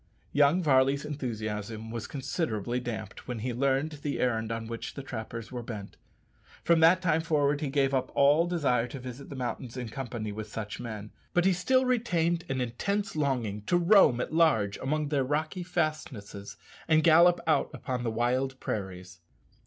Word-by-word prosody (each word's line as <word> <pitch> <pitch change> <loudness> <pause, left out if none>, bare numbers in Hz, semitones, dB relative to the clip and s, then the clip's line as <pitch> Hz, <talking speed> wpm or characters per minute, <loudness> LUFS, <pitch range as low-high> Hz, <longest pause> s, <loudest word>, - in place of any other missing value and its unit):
Young 145 +5 +4
Varley's 135 -1 +3
enthusiasm 110 -5 -4
was 115 -2 -5
considerably 125 - -2
damped 120 -5 -6
when 125 -2 -3
he 120 +3 -3
learned 140 +4 0
the 145 -1 -2
errand 115 -3 0
on 115 0 -3
which 115 0 -6
the 140 - -6
trappers 115 -2 -6
were 125 -1 -4
bent. 110 -4 -7 0.7
From 170 0 +4
that 170 +3 +5
time 160 -2 +2
forward 150 -2 +1
he 150 - -1
gave 135 -1 +1
up 130 -1 0
all 145 +5 +5
desire 135 -9 +1
to 135 +3 -7
visit 125 +2 -8
the 140 - -7
mountains 125 -1 -4
in 125 -3 -4
company 120 -3 -5
with 110 +1 -6
such 110 -2 -5
men, 110 -3 -6 0.2
but 175 0 +3
he 190 - +5
still 255 +9 +2
retained 175 -9 +1
an 135 -1 -1
intense 200 - -2
longing 125 -9 -1
to 175 - +3
roam 175 - +5
at 135 - -3
large 130 -12 +3
among 150 +2 -1
their 140 -3 +1
rocky 155 +6 -2
fastnesses 155 - -3 0.3
and 155 -1 +4
gallop 170 +2 +6
out 160 - +2
upon 125 -2 -4
the 120 - -1
wide 130 +4 0
prairies. 90 -3 -5
135 Hz, 175 wpm, -29 LUFS, 115-155 Hz, 0.7 s, gallop